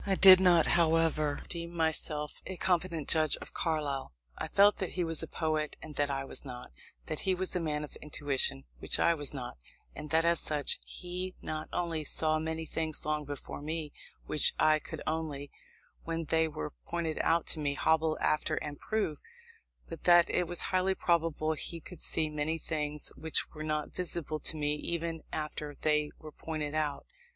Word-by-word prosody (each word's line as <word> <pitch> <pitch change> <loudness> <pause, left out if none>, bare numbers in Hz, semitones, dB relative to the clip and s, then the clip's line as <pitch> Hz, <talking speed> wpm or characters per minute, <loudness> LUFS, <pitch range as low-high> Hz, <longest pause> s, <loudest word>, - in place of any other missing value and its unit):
I 195 -1 +1
did 190 -1 +10
not, 175 -3 +5
however, 160 -3 +2
deem 170 0 -6
myself 155 -2 +1
a 185 - -6
competent 175 -4 0
judge 155 -2 +4
of - - -10
Carlyle. 145 - -2 0.2
I - - -4
felt 205 +1 +5
that 190 - -3
he 180 - 0
was 165 -1 0
a - - -4
poet, 155 -2 -1
and 155 - -9
that 145 0 0
I 135 -1 -2
was - - -5
not; 125 - -8 0.3
that 155 - -3
he 190 -1 +1
was 185 0 -2
a - - +2
man 150 -3 -2
of 150 - -8
intuition, 145 - +1 0.2
which - - +1
I 170 - +4
was 145 -4 -3
not; 125 - -7 0.4
and 150 - -7
that 160 +2 +3
as 170 -1 +4
such, 150 -2 +1
he 180 +1 -5
not 155 0 -5
only 165 -3 -1
saw 155 +1 +3
many 160 +1 -3
things 160 -1 -2
long 150 -1 -1
before 145 0 -7
me, 155 0 -4 0.3
which 150 - +6
I 155 0 +4
could - - -7
only, 155 -3 -3 0.5
when 165 0 -3
they 160 +1 +2
were 75 - -5
pointed 165 -2 -2
out 165 0 +2
to 160 - -5
me, 145 -1 -1
hobble 160 +2 +2
after 155 +1 +1
and 145 -2 -5
prove, 210 -9 -2 0.7
but - - -9
that 175 -1 +6
it 180 -1 +1
was 175 0 -1
highly 185 +1 +2
probable 165 -3 +1
he 165 +2 -3
could 170 +1 -12
see 160 -1 +1
many 150 +1 -2
things 150 -2 -3
which 160 -1 -1
were 155 - -8
not 155 -1 -2
visible 170 -4 -3
to 155 - +1
me 150 -1 0
even 165 0 -3
after 150 -1 -4
they 150 -1 +2
were 155 -1 -11
pointed 155 -1 -4
out. 150 -2 -1
155 Hz, 185 wpm, -31 LUFS, 150-170 Hz, 0.7 s, did